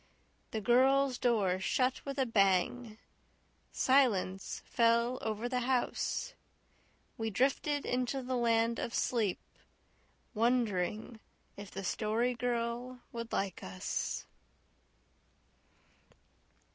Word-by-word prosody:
The 220 Hz, -, -3 dB
girls' 260 Hz, +3 st, +3 dB
door 205 Hz, -7 st, +2 dB
shut 255 Hz, +6 st, 0 dB
with 275 Hz, 0 st, -4 dB
a 265 Hz, -, +2 dB
bang. 215 Hz, +1 st, +1 dB, 0.7 s
Silence 210 Hz, -8 st, +1 dB
fell 235 Hz, +1 st, +2 dB
over 220 Hz, +2 st, -2 dB
the 250 Hz, 0 st, -1 dB
house. 255 Hz, -, -1 dB, 0.9 s
We 225 Hz, 0 st, -1 dB
drifted 280 Hz, +5 st, 0 dB
into 255 Hz, +2 st, -1 dB
the 255 Hz, +1 st, -2 dB
land 230 Hz, -1 st, +2 dB
of 235 Hz, -, -3 dB
sleep, 220 Hz, -7 st, 0 dB, 0.9 s
wondering 225 Hz, -2 st, 0 dB, 0.4 s
if 200 Hz, 0 st, -9 dB
the 195 Hz, -, -6 dB
Story 225 Hz, +6 st, 0 dB
Girl 240 Hz, +1 st, -3 dB
would 230 Hz, -1 st, -6 dB
like 195 Hz, -2 st, -2 dB
us. 95 Hz, 0 st, -3 dB
235 Hz, 95 wpm, -32 LUFS, 215-250 Hz, 0.9 s, girls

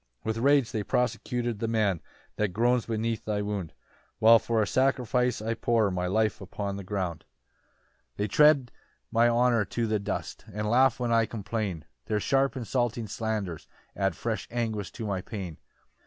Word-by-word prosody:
4 -, -, -3 dB
"With 110 Hz, -, -4 dB
rage 140 Hz, -1 st, +3 dB
they 110 Hz, -, -1 dB
persecute 120 Hz, 0 st, -1 dB
the 115 Hz, -, -1 dB
man 105 Hz, -7 st, +1 dB, 0.4 s
"That 105 Hz, -, +2 dB
groans 120 Hz, +3 st, +2 dB
beneath 115 Hz, 0 st, -1 dB
thy 105 Hz, -1 st, -1 dB
wound, 100 Hz, -5 st, -3 dB, 0.5 s
"While 115 Hz, +1 st, +7 dB
for 115 Hz, 0 st, 0 dB
a 110 Hz, -, +3 dB
sacrifice 125 Hz, -1 st, +1 dB
I 115 Hz, +1 st, 0 dB
pour 115 Hz, -3 st, +1 dB
"My 90 Hz, 0 st, -1 dB
life 110 Hz, +2 st, +1 dB
upon 100 Hz, +1 st, -4 dB
the 100 Hz, -, -6 dB
ground. 90 Hz, -4 st, -3 dB, 0.9 s
5 -, -, -43 dB
"They 105 Hz, -, 0 dB
tread 145 Hz, +1 st, +5 dB, 0.4 s
my 115 Hz, +1 st, +4 dB
honour 120 Hz, -1 st, +3 dB
to 115 Hz, +3 st, -2 dB
the 110 Hz, -1 st, 0 dB
dust, 100 Hz, -1 st, -4 dB
"And 105 Hz, +2 st, -3 dB
laugh 130 Hz, +3 st, +4 dB
when 120 Hz, -1 st, -1 dB
I 115 Hz, -1 st, +3 dB
complain 100 Hz, -6 st, -3 dB, 0.2 s
"Their 105 Hz, -1 st, +1 dB
sharp 135 Hz, +4 st, +1 dB
insulting 120 Hz, -1 st, -1 dB
slanders 105 Hz, -6 st, -3 dB, 0.3 s
add -, -, 0 dB
"Fresh -, -, -3 dB
anguish 110 Hz, -5 st, -2 dB
to 115 Hz, -, -5 dB
my 100 Hz, -3 st, -2 dB
pain. 90 Hz, -6 st, -7 dB
110 Hz, 170 wpm, -28 LUFS, 100-120 Hz, 0.9 s, While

